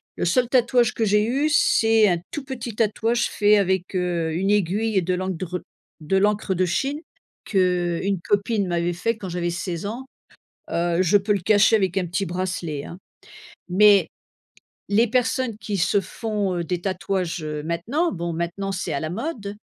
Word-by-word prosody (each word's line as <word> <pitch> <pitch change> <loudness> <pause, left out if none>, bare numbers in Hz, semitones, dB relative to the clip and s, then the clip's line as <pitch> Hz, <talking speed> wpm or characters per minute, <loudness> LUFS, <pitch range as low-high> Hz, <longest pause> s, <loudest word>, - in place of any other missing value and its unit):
le - - -2
seul 240 +9 +2
tatouage 245 -2 +3
que 225 - -1
j'ai 210 0 +3
eu, 275 +6 +1
c'est 225 -6 +4
un 175 -3 +2
tout 295 - -5
petit 245 -4 -6
tatouage 225 +2 +1
fait 210 +1 +4
avec, 190 -2 0
heu, 175 -3 -1
une 190 +4 0
aiguille 210 +2 +1
et - - +4
de 180 +1 -1
l'endre 180 -1 -3 0.4
de 160 +5 0
l'encre 205 0 +1
de 185 +1 +2
Chine, 275 - -1 0.5
qu'une 180 0 0
copine 205 0 +1
m'avait 175 0 0
fait 220 +6 -1
quand 195 -4 -7
j'avais 175 0 -2
16 175 0 -4
ans. 235 +6 -5 0.7
Heu, 170 +1 +1
je 185 +3 +4
peux 205 +1 +1
le 200 - 0
cacher 215 +4 +4
avec 190 -3 0
un 180 - -1
petit 175 +3 -2
bracelet, 175 -4 -3
hein. 175 - -9 0.7
Mais, 200 -1 +5 0.8
les 220 +4 +3
personnes 250 -1 0
qui 200 -1 -4
se 170 +4 +2
font, 200 -1 -3
heu, 170 - -2
des 175 +1 -2
tatouages, 185 -2 -2
heu, 150 -1 -4
maintenant, 220 - -1
bon, 170 -1 -3
maintenant, 175 +4 -3
c'est 185 -3 -3
à 140 - -1
la 155 - -3
mode, 210 - -4
195 Hz, 175 wpm, -23 LUFS, 175-220 Hz, 0.8 s, Mais